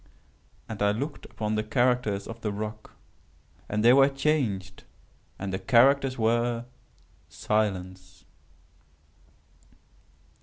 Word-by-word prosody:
And 110 -3 -7
I 105 0 +3
looked 140 +7 -5
upon 105 -1 -4
the 110 0 0
characters 120 -3 0
of 115 0 -9
the 105 - -2
rock, 105 +1 -6 0.8
and 105 +2 -1
they 120 - +8
were 135 +1 +6
changed; 135 -10 -1 0.5
and 95 -1 -5
the 95 - -2
characters 135 +2 +3
were 120 +1 0 0.6
SILENCE. 95 -5 -3
110 Hz, 105 wpm, -27 LUFS, 100-125 Hz, 0.8 s, they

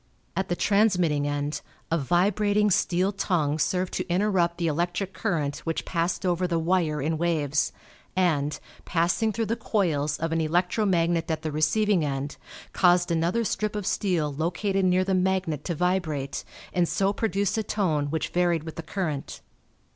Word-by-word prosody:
At 190 0 -1
the 175 - +1
transmitting 180 -9 +2
end 145 +1 -2 0.3
a 165 - +3
vibrating 205 +7 +2
steel 185 +2 +2
tongue 165 -7 0
served 180 +4 0
to - - -2
interrupt 180 -2 +1
the 170 - -1
electric 175 +5 -1
current 155 -9 -1
which 165 -1 -3
passed 170 +2 -1
over 180 0 +1
the 170 -1 0
wire 165 -2 +1
in 160 +1 -1
waves, 150 -4 +1 0.4
and, 155 -6 +1 0.2
passing 180 +6 +1
through 225 +1 -1
the 225 - -1
coils 155 -11 0
of 165 0 -2
an 165 0 +1
electro 180 +6 +1
magnet 170 -2 +1
at 160 0 -2
the 155 - -2
receiving 170 +5 +2
end, 140 0 -3 0.4
caused 175 -1 +4
another 170 +8 +1
strip 215 -1 -2
of 205 -2 -3
steel 170 -9 0
located 185 +6 0
near 185 0 +3
the 190 0 0
magnet 185 -5 0
to 170 - -2
vibrate 155 -6 -1 0.3
and 175 -2 +2
so 195 +1 +1
produce 200 -3 0
a 220 - +1
tone 170 -9 0
which 160 +2 -2
varied 175 -3 +1
with 160 -1 -8
the - - -3
current. 155 -4 -4
175 Hz, 165 wpm, -26 LUFS, 155-190 Hz, 0.4 s, caused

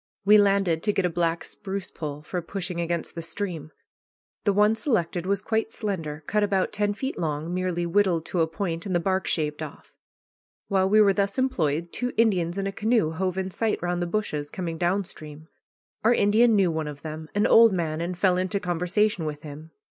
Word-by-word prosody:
We 210 +1 +7
landed 195 -5 +2
to 210 - +1
get 195 - +1
a 180 - 0
black 170 0 0
spruce 195 -1 -6
pole 150 -2 -6
for 180 +3 -3
pushing 180 0 -4
against 170 0 -2
the 165 - -5
stream. 165 -2 -4 0.8
The 205 - +4
one 210 +2 +4
selected 185 - -1
was 195 -1 0
quite 225 0 -1
slender, 165 -10 -4
cut 210 +6 +1
about 200 -2 +1
ten 205 0 0
feet 265 +5 -4
long, 155 0 -2
merely 180 -1 -1
whittled 170 -2 +2
to 175 - -1
a 160 - +3
point, 170 +1 -4
and 185 - -1
the - - +4
bark 190 +2 0
shaved 150 -1 -1
off. 155 -2 -9 0.8
While 190 -1 +2
we 215 +2 +6
were 200 -2 +5
thus 200 0 -1
employed, 170 - 0
two 245 0 -2
Indians 185 -6 +2
in 195 - -1
a 195 - -1
canoe 215 -5 +1
hove 185 +2 -2
in 190 0 -2
sight 220 +3 -1
round 175 0 -1
the 175 - -1
bushes, 160 -7 -2
coming 165 -2 -5
down 185 +3 +1
stream. 155 -2 -10 0.6
Our 235 +2 +5
Indian 220 +3 +4
knew 190 -4 +3
one 160 -1 -2
of 145 -1 -8
them, 155 0 -7
an 205 - +3
old 230 0 +7
man, 165 -3 -2
and 175 +1 -3
fell 180 -1 +3
into 185 +2 -1
conversation 180 +1 0
with 150 0 -5
him. 155 +1 -9
180 Hz, 205 wpm, -25 LUFS, 165-205 Hz, 0.8 s, We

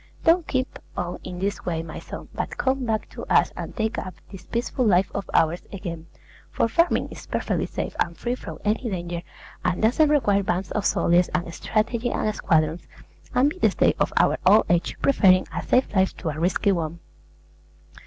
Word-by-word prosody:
Don't 335 +1 +4
keep 260 -1 -2 0.2
on 175 0 -3
in 180 - -6
this 200 +2 -2
way, 165 -2 -2
my 160 -2 -7
son; - - -9
but - - -4
come 265 -1 0
back 220 -2 -1
to - - -8
us - - +3
and - - -6
take 220 -1 -1
up 185 - -7 0.2
this 190 -2 -11
peaceful 240 +2 -1
life 190 -4 +3
of 195 - -4
ours 165 +2 +2
again 170 -4 -6 0.4
(for - - +1
farming 335 +9 +2
is - - -10
perfectly - - -1
safe - - -4
and 170 -1 0
free 240 - -2
from 255 - -7
any 225 +3 0
danger, 175 -3 -4 0.4
and 180 0 0
doesn't 290 +7 +4
require 205 -9 +3
bands 185 0 -2
of 210 -2 0
soldiers 175 +1 +3
and 175 -1 -2
strategy 225 +5 -1
and 215 - -1
squadrons), 160 0 +1 0.5
and 275 +4 +4
be 365 - -9
the - - +4
stay - - +3
of - - +1
our - - +3
old 205 +4 +6
age, 175 0 +1
preferring 190 -9 +5
a - - -1
safe 255 -4 +1
life 190 0 +2
to 165 - -3
a 155 0 -4
risky 185 +4 +2
one. 170 -2 -2
195 Hz, 195 wpm, -24 LUFS, 175-235 Hz, 0.5 s, old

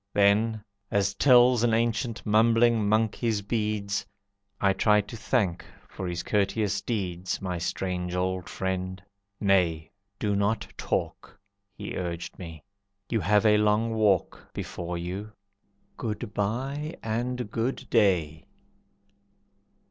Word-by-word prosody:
Then, 105 +2 +3 0.3
as 100 -1 +1
tells 125 0 +5
An 115 -2 +3
ancient 115 0 -1
mumbling 115 0 +4
monk 110 0 +2
his 110 -4 -1
beads, 105 -2 -1 0.6
I 100 -1 +3
tried 105 +1 +3
to - - -7
thank 105 -6 0 0.2
for 95 - -6
his 90 0 -3
courteous 100 -1 0
deeds 95 -5 -3
My 90 -3 -3
strange 90 +1 -2
old 90 0 -2
friend. 95 0 -3 0.4
"Nay, 90 -5 +2 0.3
do 105 -2 0
not 100 +2 0
talk," - - -3 0.4
He 100 - -6
urged 85 -2 -5
me, 80 -4 -9 0.5
"you 115 - +2
have 105 +3 +3
a 105 -1 +6
long 105 +2 +2
walk 105 -5 +1
Before 85 0 -4
you. 95 +5 -5 0.6
Good 105 -3 -4
by 135 +10 -2
and 120 0 -2
Good 115 +4 -2
day!" 85 - +2
105 Hz, 120 wpm, -27 LUFS, 95-115 Hz, 0.6 s, a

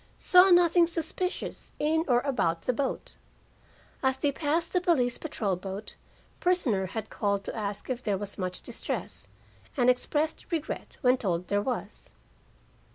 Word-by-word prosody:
Saw 365 +1 +6
nothing 350 -1 +6
suspicious 335 +2 -3
in 320 +2 +2
or 245 -2 +4
about 170 -12 0
the 250 - +1
boat. 270 +2 -3 0.8
As 265 -1 +2
they 285 +1 +1
passed 315 +4 -1
the 360 - +2
police 265 -10 +2
patrol 225 - -2
boat, 195 +3 -6 0.5
prisoner 255 - +1
had 220 +4 -6
called 200 -2 0
to - - -5
ask 205 -2 -4
if 255 -1 -3
there 205 -5 0
was 205 +1 -5
much 185 -1 -4
distress, - - -5 0.5
and 250 -1 +6
expressed 300 +7 -2
regret 320 -3 -4
when 255 -2 +4
told 180 -6 -2
there 205 0 +2
was. 250 +3 -4
255 Hz, 150 wpm, -28 LUFS, 205-320 Hz, 0.8 s, Saw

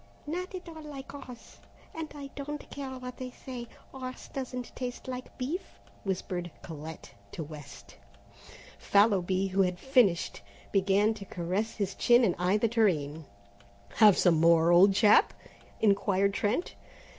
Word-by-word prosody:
"Not 360 +5 -4
at 360 -1 -8
all 320 -1 -9
like 285 -3 -9
horse, 255 -4 -11 0.4
and 320 -1 -5
I 280 -1 -8
don't 295 +1 -6
care 280 -2 -5
what 255 -1 -7
they 255 -1 -5
say, 250 -1 -8 0.2
horse 255 -1 -8
doesn't 250 -2 -6
taste 250 0 -5
like 255 0 -7
beef," 300 +9 -2 0.4
whispered 180 -2 -3
Colette 160 0 -8 0.2
to 160 - -4
West. 145 -9 -11 0.8
Fallowby, 195 -2 +3
who 195 +1 +2
had 180 -1 +1
finished, 225 - +2 0.3
began 200 +2 +3
to 205 -2 -9
caress 185 +6 -2
his 200 -2 -2
chin 240 +1 +4
and 190 -6 +3
eye 180 +3 +2
the 230 - +2
tureen. 160 -10 +1 0.7
"Have 210 -4 +7
some 170 -4 +4
more, 165 0 +5
old 190 +3 +6
chap?" 210 0 +5 0.5
inquired 200 -1 +3
Trent. 215 - -1
210 Hz, 145 wpm, -29 LUFS, 180-255 Hz, 0.8 s, Have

